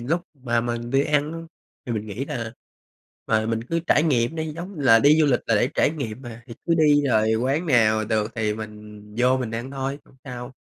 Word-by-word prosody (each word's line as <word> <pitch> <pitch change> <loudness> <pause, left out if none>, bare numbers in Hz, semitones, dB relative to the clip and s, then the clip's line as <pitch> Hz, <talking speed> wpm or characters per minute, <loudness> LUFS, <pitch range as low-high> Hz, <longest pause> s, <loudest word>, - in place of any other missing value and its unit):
lúc 160 +9 -1
mà 120 -4 -1
mình 120 0 -4
đi 135 +1 +3
ăn 150 +1 +1
á 165 - -5 0.5
thì 120 - -2
mình 110 -1 -3
nghĩ 105 +6 -4
là, 115 -5 -5 0.7
ờ, 110 0 +1
mình 115 0 -1
cứ 165 +6 -1
trải 150 - +4
nghiệm 135 -1 +1
đi, 160 -1 -3
giống 175 +1 -7
là 125 -5 +6
đi 150 +5 +5
du 155 - +4
lịch 125 -4 +2
là 115 - +2
để 120 +5 +2
trải - - +3
nghiệm 135 -6 -5
mà, 120 -1 -9
thì 115 - -9
cứ 170 - +3
đi 150 -2 +4
rồi 110 -2 +3
quán 135 +9 0
nào 110 -5 +3
được 110 0 -1
thì 110 -2 -1
mình 105 -1 -9 0.2
vô 125 +1 +4
mình 125 -4 -3
ăn 115 +3 -5
thôi, 135 +1 -3
hổng 130 - -23
sao, 125 -1 -7
125 Hz, 230 wpm, -23 LUFS, 110-145 Hz, 0.7 s, là